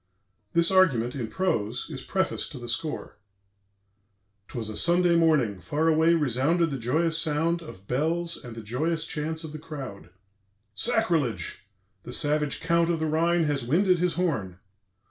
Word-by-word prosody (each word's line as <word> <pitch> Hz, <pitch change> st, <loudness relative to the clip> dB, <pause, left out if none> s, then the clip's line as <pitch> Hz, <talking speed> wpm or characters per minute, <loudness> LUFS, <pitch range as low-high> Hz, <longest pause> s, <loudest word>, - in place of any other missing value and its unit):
This 170 Hz, +2 st, +3 dB
argument, 135 Hz, -11 st, +3 dB
in 125 Hz, -5 st, -3 dB
prose, 115 Hz, -, -1 dB
is -, -, -6 dB
prefaced -, -, -1 dB
to -, -, -7 dB
the 120 Hz, -1 st, -8 dB
score: 150 Hz, +3 st, -4 dB, 1.3 s
"'Twas 115 Hz, -3 st, -5 dB
a 110 Hz, -, -5 dB
Sunday 175 Hz, +3 st, +3 dB
morning; 150 Hz, -, +3 dB
far 150 Hz, -, -1 dB
away 160 Hz, +1 st, +4 dB
resounded 150 Hz, +4 st, +1 dB
the 135 Hz, -, -3 dB
joyous 160 Hz, +8 st, +2 dB
sound 165 Hz, +2 st, +1 dB
of 100 Hz, -, -12 dB
bells 165 Hz, +6 st, 0 dB
and 120 Hz, -2 st, -10 dB
the 115 Hz, -, -8 dB
joyous 155 Hz, +9 st, -1 dB
chants 160 Hz, +1 st, -3 dB
of 160 Hz, -, -6 dB
the 155 Hz, -, -7 dB
crowd.... 140 Hz, -, -8 dB, 0.6 s
Sacrilege! 145 Hz, -, -1 dB, 0.3 s
The 120 Hz, -, -8 dB
savage 150 Hz, 0 st, +1 dB
Count 170 Hz, 0 st, +2 dB
of 170 Hz, -2 st, 0 dB
the 160 Hz, -, 0 dB
Rhine 165 Hz, +2 st, +2 dB
has 145 Hz, -4 st, 0 dB
winded 180 Hz, +8 st, +3 dB
his 180 Hz, 0 st, +1 dB
horn. 110 Hz, -, -1 dB
155 Hz, 155 wpm, -26 LUFS, 125-170 Hz, 1.3 s, away